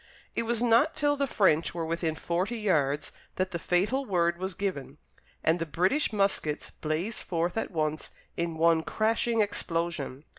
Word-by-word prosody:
It 230 - -1
was 235 0 +1
not 245 +7 +4
till 290 0 +2
the 280 -1 0
French 170 - +2
were 165 -1 -2
within 165 -1 -1
forty 180 +8 -1
yards 150 -8 +1 0.2
that 185 +1 -1
the 170 - -3
fatal 200 +12 +1
word 170 -6 +1
was 190 -1 -3
given, 150 -8 -3 0.5
and 165 +2 +3
the 165 - -1
British 185 - +1
muskets 195 -7 0
blazed 165 +8 -2
forth 170 0 -1
at 225 - -1
once 155 -3 -2 0.3
in 170 -1 -2
one 165 0 +4
crashing 225 +4 +1
explosion. 165 -8 -2
175 Hz, 160 wpm, -28 LUFS, 160-215 Hz, 0.5 s, not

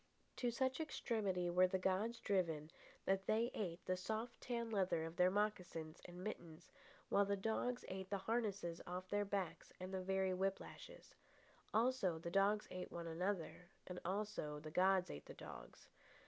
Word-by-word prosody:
To 245 - +2
such 260 +3 +1
extremity 205 - 0
were 180 +1 +6
the 190 +1 +1
gods 190 +5 +1
driven 165 -6 +1 0.3
that 195 0 +2
they 230 +3 +3
ate 175 -5 -3
the 185 - +2
soft 220 +5 -3
tanned 235 -2 -2
leather 185 -5 +2
of 165 +1 -6
their 180 0 +6
mocassins 180 -6 -1
and 180 +1 -8
mittens, 170 -5 -6 0.4
while 200 - +5
the 200 0 +1
dogs 225 +4 0
ate 190 0 -4
the 200 - +1
harnesses 200 -5 -1
off 180 +1 -3
their 205 0 +2
backs 195 -3 -2
and 185 +1 -5
the 190 - 0
very 190 0 +2
whip 195 +1 +1
lashes. - - -10 0.6
Also, 220 -6 +3
the 170 +1 -4
dogs 200 +3 +4
ate 185 0 -4
one 170 -1 -4
another, 175 +1 -2 0.2
and 180 -1 -5
also 190 -6 -1
the 155 +1 -7
gods 185 +2 +4
ate 75 - -7
the - - -8
dogs. - - -10
190 Hz, 170 wpm, -42 LUFS, 180-210 Hz, 0.6 s, were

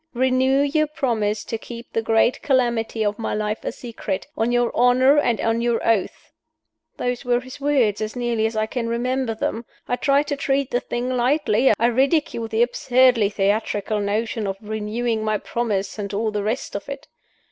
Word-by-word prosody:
Renew 260 +2 +3
your 305 +2 +1
promise 220 -8 -1
to 225 - -4
keep 235 +1 -10
the 225 - +1
great 225 +2 +2
calamity 235 -5 +1
of 205 +1 -1
my 225 - -2
life 210 0 -2
a - - -2
secret, 230 -5 -5
on 225 +2 0
your 245 0 +2
honor 255 +4 +5
and 240 -6 +1
on 225 +1 0
your 235 -1 +1
oath. 225 -5 0 0.7
'Those 245 0 -2
were 245 0 +2
his 255 +2 -11
words, 260 -8 +2
as 215 +2 -3
nearly 240 -3 0
as 225 - -6
I 215 0 +1
can 230 +1 -3
remember 245 0 -1
them. 225 +1 -2 0.2
I 245 - 0
tried 280 +2 +2
to 285 - 0
treat 275 -1 -1
the 245 - +2
thing 245 0 -4
lightly; 255 -1 +2
I 230 - +1
ridiculed 255 -1 +1
the 225 +2 +3
absurdly 245 -2 +3
theatrical 205 +1 0
notion 215 +2 -1
of 195 0 -3
'renewing 220 +2 -2
my 215 -1 +1
promise,' 210 -2 -3
and 200 -1 -4
all 215 +1 0
the 210 -1 -2
rest 220 +6 -3
of - - -5
it. - - -7
235 Hz, 185 wpm, -22 LUFS, 215-255 Hz, 0.7 s, honor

